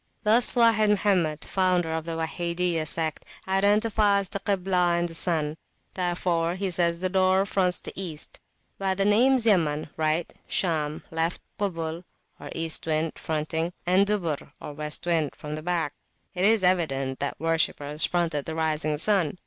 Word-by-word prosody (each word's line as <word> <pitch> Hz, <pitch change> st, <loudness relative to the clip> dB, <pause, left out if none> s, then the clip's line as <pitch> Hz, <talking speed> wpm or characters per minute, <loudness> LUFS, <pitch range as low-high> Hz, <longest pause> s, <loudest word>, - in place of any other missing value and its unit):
Thus 230 Hz, +4 st, +6 dB
Wahid 225 Hz, -3 st, +4 dB
Mohammed, 185 Hz, -7 st, +1 dB
founder 180 Hz, -3 st, +1 dB
of 160 Hz, 0 st, -3 dB
the 165 Hz, -, -4 dB
Wahidiyah 170 Hz, 0 st, -1 dB
sect, 160 Hz, 0 st, +1 dB, 0.2 s
identifies 200 Hz, 0 st, +2 dB
the 200 Hz, -, -4 dB
Kiblah 185 Hz, -3 st, +1 dB
and 175 Hz, 0 st, 0 dB
the 165 Hz, -, -10 dB
sun; 160 Hz, -2 st, -1 dB, 0.4 s
wherefore 175 Hz, -2 st, 0 dB
he 190 Hz, 0 st, -2 dB
says 170 Hz, -1 st, +1 dB
the 185 Hz, -, +1 dB
door 190 Hz, +1 st, +2 dB
fronts 185 Hz, -3 st, 0 dB
the -, -, -8 dB
East. 170 Hz, -6 st, -3 dB, 0.4 s
By 190 Hz, -1 st, 0 dB
the 195 Hz, +1 st, +1 dB
names 240 Hz, +4 st, +4 dB
Yaman 155 Hz, -8 st, +1 dB
(right 160 Hz, +1 st, +1 dB
hand), -, -, -25 dB
Sham 155 Hz, -4 st, -1 dB
(left 165 Hz, +1 st, -1 dB, 0.2 s
hand), 200 Hz, -4 st, -1 dB
Kubul, 165 Hz, +1 st, -4 dB, 0.4 s
or -, -, -9 dB
the -, -, -7 dB
East 165 Hz, 0 st, 0 dB
wind 155 Hz, 0 st, -1 dB
(fronting), 160 Hz, +2 st, -2 dB
and 185 Hz, +3 st, +3 dB
Dubur, 170 Hz, -10 st, -2 dB
or -, -, -8 dB
the -, -, -8 dB
West 150 Hz, +2 st, -3 dB
wind 165 Hz, -4 st, 0 dB
(from 150 Hz, 0 st, -7 dB
the 155 Hz, -, -5 dB
back), 165 Hz, -3 st, -1 dB, 0.4 s
it 185 Hz, 0 st, 0 dB
is 220 Hz, -1 st, +4 dB
evident 135 Hz, -8 st, +1 dB
that 140 Hz, -, -3 dB
worshippers 155 Hz, -2 st, 0 dB
fronted 165 Hz, -5 st, 0 dB
the 160 Hz, -, -5 dB
rising 155 Hz, -1 st, -1 dB
sun. 185 Hz, -2 st, +1 dB
170 Hz, 170 wpm, -26 LUFS, 160-190 Hz, 0.4 s, Thus